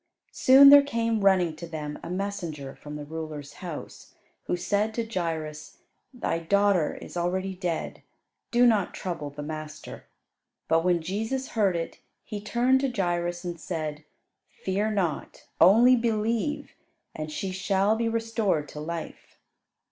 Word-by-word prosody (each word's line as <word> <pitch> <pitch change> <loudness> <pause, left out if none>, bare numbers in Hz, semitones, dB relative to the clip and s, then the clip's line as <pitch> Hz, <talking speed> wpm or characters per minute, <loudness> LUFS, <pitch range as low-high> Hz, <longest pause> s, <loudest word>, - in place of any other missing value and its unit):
Soon 270 +2 +8
there 285 0 +10
came 230 -5 -1
running 185 -5 +3
to 170 - -7
them 150 -2 -6
a 170 - -7
messenger 175 -7 -4
from 150 0 -9
the 150 -1 -6
ruler's 155 -2 -7
house, 170 -5 -8 0.3
who 180 - -1
said 205 +4 0
to 235 - -1
Jairus, 160 -7 -4 0.3
"Thy 245 -9 -2
daughter 200 -1 +2
is - - -10
already 185 +2 -1
dead; 180 -3 -4 0.5
do 245 +1 +4
not 215 -6 +2
trouble 170 -6 -4
the 145 +1 -8
master." 155 0 -7 0.6
But 165 +1 +3
when 175 -2 +2
Jesus 225 +9 -3
heard 200 -5 +1
it 165 -1 -4 0.2
He 210 -1 -6
turned 245 +5 +2
to 275 - +1
Jairus 175 -5 -1
and 175 -2 -5
said, 155 -3 -4 0.6
"Fear 200 +3 0
not. 185 -8 -2
Only 235 +7 +7
believe, 230 +4 -1 0.4
and 155 0 -5
she 190 +4 -3
shall 195 +2 +1
be 230 0 0
restored 225 -9 0
to 150 - -8
life." 165 +2 -7
185 Hz, 145 wpm, -27 LUFS, 160-220 Hz, 0.6 s, there